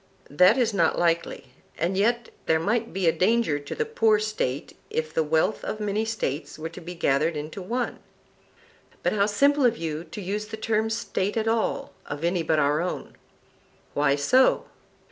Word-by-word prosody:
That 180 Hz, -, +5 dB
is 235 Hz, -4 st, +2 dB
not 170 Hz, -5 st, +2 dB
likely; 170 Hz, -1 st, -1 dB, 0.2 s
and 175 Hz, +4 st, 0 dB
yet 235 Hz, +4 st, +1 dB, 0.2 s
there 160 Hz, 0 st, +3 dB
might 225 Hz, +6 st, 0 dB
be 190 Hz, -1 st, -2 dB
a -, -, +6 dB
danger 185 Hz, -5 st, +2 dB
to 145 Hz, -, -7 dB
the 455 Hz, -, -1 dB
poor 225 Hz, -, +3 dB
State 210 Hz, -11 st, -3 dB
if 155 Hz, -1 st, -2 dB
the -, -, +2 dB
wealth 160 Hz, +6 st, +1 dB
of 215 Hz, -, -4 dB
many 210 Hz, +1 st, -1 dB
States 175 Hz, -10 st, -3 dB
were 160 Hz, +1 st, -5 dB
to 165 Hz, -, -11 dB
be 175 Hz, +1 st, -7 dB
gathered 155 Hz, 0 st, +1 dB
into 155 Hz, +6 st, -6 dB
one. 240 Hz, +6 st, -3 dB, 1.0 s
But -, -, +1 dB
how 200 Hz, -1 st, +2 dB
simple 280 Hz, +7 st, +3 dB
of 235 Hz, -2 st, +3 dB
you 160 Hz, -1 st, -3 dB
to 160 Hz, +5 st, -9 dB
use 205 Hz, +2 st, -3 dB
the 220 Hz, -, -6 dB
term 220 Hz, 0 st, 0 dB
State 210 Hz, -2 st, -2 dB
at 220 Hz, 0 st, 0 dB
all 225 Hz, 0 st, 0 dB
of 145 Hz, +2 st, -5 dB
any 175 Hz, +1 st, +1 dB
but 160 Hz, -1 st, +1 dB
our 150 Hz, +1 st, +2 dB
own! 180 Hz, -, -4 dB, 0.8 s
Why 145 Hz, -1 st, +3 dB
so? 255 Hz, -, +3 dB
190 Hz, 185 wpm, -25 LUFS, 160-220 Hz, 1.0 s, a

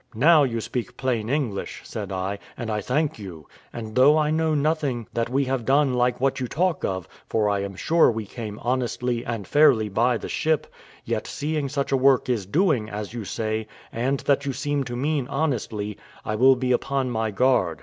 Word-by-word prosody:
"Now 155 Hz, +7 st, +6 dB
you 115 Hz, -5 st, 0 dB
speak 125 Hz, +2 st, -4 dB
plain 120 Hz, -4 st, -1 dB
English," 130 Hz, -8 st, -2 dB
said -, -, -6 dB
I, 95 Hz, +2 st, -3 dB, 0.2 s
"and 115 Hz, -2 st, -4 dB
I 105 Hz, 0 st, -1 dB
thank 145 Hz, +5 st, -1 dB
you; 85 Hz, -7 st, -9 dB, 0.3 s
and 110 Hz, -2 st, -7 dB
though 135 Hz, +5 st, +6 dB
I 150 Hz, -1 st, +2 dB
know 160 Hz, 0 st, +1 dB
nothing 145 Hz, -5 st, 0 dB
that 115 Hz, 0 st, -1 dB
we 135 Hz, +2 st, +1 dB
have 130 Hz, -2 st, -1 dB
done 135 Hz, +1 st, +3 dB
like 125 Hz, 0 st, +1 dB
what 135 Hz, +1 st, +1 dB
you 125 Hz, -, -2 dB
talk 175 Hz, +4 st, 0 dB
of, 95 Hz, -2 st, -2 dB, 0.2 s
for 110 Hz, -2 st, +1 dB
I 100 Hz, -, 0 dB
am 100 Hz, 0 st, -4 dB
sure 165 Hz, -, +4 dB
we 110 Hz, -2 st, -3 dB
came 105 Hz, -1 st, -7 dB
honestly 125 Hz, -1 st, -1 dB
and 115 Hz, -5 st, -4 dB
fairly 125 Hz, -8 st, +4 dB
by 115 Hz, +4 st, +2 dB
the -, -, -7 dB
ship; 155 Hz, -1 st, 0 dB, 0.4 s
yet -, -, -2 dB
seeing 150 Hz, -1 st, -2 dB
such 140 Hz, -1 st, -2 dB
a 135 Hz, -, +4 dB
work 135 Hz, 0 st, +3 dB
is 110 Hz, -7 st, -1 dB
doing, 145 Hz, -, +1 dB
as 105 Hz, 0 st, -6 dB
you 115 Hz, -3 st, -5 dB
say, 110 Hz, +1 st, -2 dB, 0.2 s
and 130 Hz, +4 st, -1 dB
that 140 Hz, 0 st, +2 dB
you 140 Hz, -1 st, -2 dB
seem 145 Hz, +1 st, -1 dB
to 120 Hz, -, -5 dB
mean 140 Hz, 0 st, -1 dB
honestly, 115 Hz, -9 st, -2 dB, 0.3 s
I 110 Hz, -, -2 dB
will 130 Hz, +5 st, +5 dB
be 125 Hz, 0 st, -1 dB
upon 130 Hz, +1 st, 0 dB
my 110 Hz, -1 st, -1 dB
guard." 100 Hz, -7 st, +2 dB
125 Hz, 200 wpm, -24 LUFS, 110-140 Hz, 0.4 s, Now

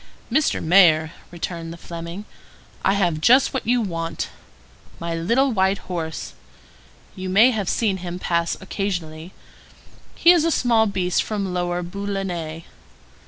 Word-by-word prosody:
"Mr. 300 Hz, +4 st, +1 dB
Mayor," 160 Hz, -3 st, +5 dB, 0.2 s
returned 170 Hz, -1 st, -5 dB
the 170 Hz, -, -9 dB
Fleming, 170 Hz, +4 st, -7 dB, 0.6 s
"I 195 Hz, -, +3 dB
have 175 Hz, -6 st, 0 dB
just 255 Hz, -, +5 dB
what 265 Hz, -, -3 dB
you 245 Hz, 0 st, +3 dB
want. 165 Hz, -5 st, -3 dB, 0.7 s
My 170 Hz, 0 st, -3 dB
little 235 Hz, +12 st, +1 dB
white 190 Hz, -2 st, +2 dB
horse—you 165 Hz, -, -9 dB
may 220 Hz, +7 st, +6 dB
have 210 Hz, -6 st, -2 dB
seen 205 Hz, -5 st, +1 dB
him 175 Hz, -1 st, -6 dB
pass 170 Hz, -2 st, -1 dB
occasionally; 175 Hz, -4 st, -4 dB, 0.8 s
he 340 Hz, -, +6 dB
is 345 Hz, -3 st, +4 dB
a 330 Hz, -, +2 dB
small 235 Hz, -7 st, +3 dB
beast 185 Hz, -3 st, 0 dB
from 200 Hz, -4 st, -3 dB
Lower 175 Hz, 0 st, -1 dB
Boulonnais. 180 Hz, -4 st, -4 dB
185 Hz, 130 wpm, -22 LUFS, 170-205 Hz, 0.8 s, may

